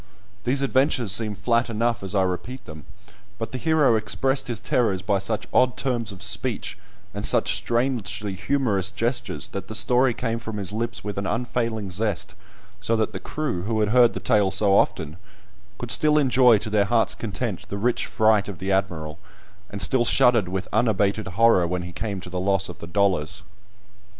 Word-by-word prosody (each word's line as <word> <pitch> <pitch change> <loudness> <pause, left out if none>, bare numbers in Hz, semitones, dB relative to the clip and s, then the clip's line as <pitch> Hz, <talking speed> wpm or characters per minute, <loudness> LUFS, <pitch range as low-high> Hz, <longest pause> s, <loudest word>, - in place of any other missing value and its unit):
These 135 +3 +2
adventures 130 -5 +1
seem 105 0 +1
flat 115 +4 0
enough 115 +1 -1
as 95 +1 -5
I 95 - +3
repeat 95 +8 -4
them, 80 -2 -11 0.5
but 115 0 -5
the 130 - -5
hero 155 -6 +3
expressed 130 +6 0
his 120 -4 -3
terrors 100 -7 0
by 100 0 +1
such 105 +3 -2
odd 125 -1 +3
terms 120 -4 -2
of 100 0 -8
speech, 105 +3 -1 0.4
and - - -5
such - - +5
strangely 110 -5 -1
humorous 100 -2 0
gestures, 120 +4 -2
that 100 - -6
the 110 - -7
story 125 +2 +2
came 115 -1 -2
from 110 -2 -6
his 100 -1 -2
lips 115 +2 -4
with 100 -1 -4
an 100 - -3
unfailing 115 -4 -2
zest, 105 0 -1 0.5
so 115 - 0
that 110 -1 -1
the - - -5
crew, 150 -13 -3
who 110 0 -1
had 105 - +1
heard 120 +1 +5
the - - -4
tale 105 -2 +2
so 100 +1 +3
often, 80 -4 0 0.6
could 120 -1 -2
still 150 +3 +4
enjoy 130 -5 +5
to 105 +1 -5
their 105 -2 +3
hearts' 110 -2 +2
content 105 0 -5
the 100 - -4
rich 120 +4 0
fright 110 -2 +2
of 95 - -7
the 95 +3 -3
Admiral, 85 -6 -2 0.5
and 100 -1 -1
still 120 +6 +3
shuddered 120 -4 +4
with 95 +1 -4
unabated 110 -2 +1
horror 95 -1 +3
when 90 +1 -3
he 90 - -7
came 100 +2 -4
to 90 - -9
the 90 - -3
loss 95 0 +1
of 90 - -10
the 85 - -8
dollars. 95 -2 0
110 Hz, 190 wpm, -23 LUFS, 95-120 Hz, 0.6 s, such